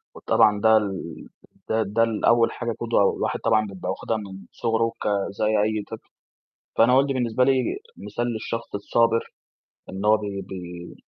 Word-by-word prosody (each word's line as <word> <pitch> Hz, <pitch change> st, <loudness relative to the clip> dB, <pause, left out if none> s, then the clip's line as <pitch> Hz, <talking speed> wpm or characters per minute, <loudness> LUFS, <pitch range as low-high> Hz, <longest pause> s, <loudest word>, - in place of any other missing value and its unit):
وطبعًا 105 Hz, -1 st, +3 dB
ده 110 Hz, 0 st, +6 dB
ال 95 Hz, -6 st, -4 dB, 0.4 s
ده 110 Hz, 0 st, +2 dB
ده 105 Hz, +3 st, +1 dB
ال 115 Hz, -2 st, -1 dB
أول 115 Hz, 0 st, +4 dB
حاجة 120 Hz, -1 st, -3 dB
قُدوة 115 Hz, -3 st, +1 dB, 0.2 s
الواحد -, -, -2 dB
طبعًا 110 Hz, -1 st, +2 dB
بيبقى 95 Hz, -3 st, -6 dB
واخِدها 110 Hz, -, -2 dB
من 95 Hz, -2 st, -9 dB
صُغره 115 Hz, 0 st, 0 dB
ك -, -, -2 dB, 0.3 s
زي -, -, +2 dB
أي 110 Hz, 0 st, +1 dB
طفل، -, -, -9 dB, 0.7 s
فأنا 120 Hz, +2 st, +5 dB
والدي 135 Hz, +1 st, +3 dB
بالنسبة 125 Hz, -1 st, +1 dB
لي 135 Hz, -, +4 dB, 0.4 s
مثال 120 Hz, -, -4 dB
للشخص 115 Hz, 0 st, -5 dB
الصابر، 115 Hz, +2 st, +2 dB, 0.7 s
إن 95 Hz, +2 st, -6 dB
هو 110 Hz, +1 st, +5 dB
بي 100 Hz, -2 st, -5 dB
بي 90 Hz, -2 st, -8 dB
110 Hz, 165 wpm, -24 LUFS, 100-115 Hz, 0.7 s, ده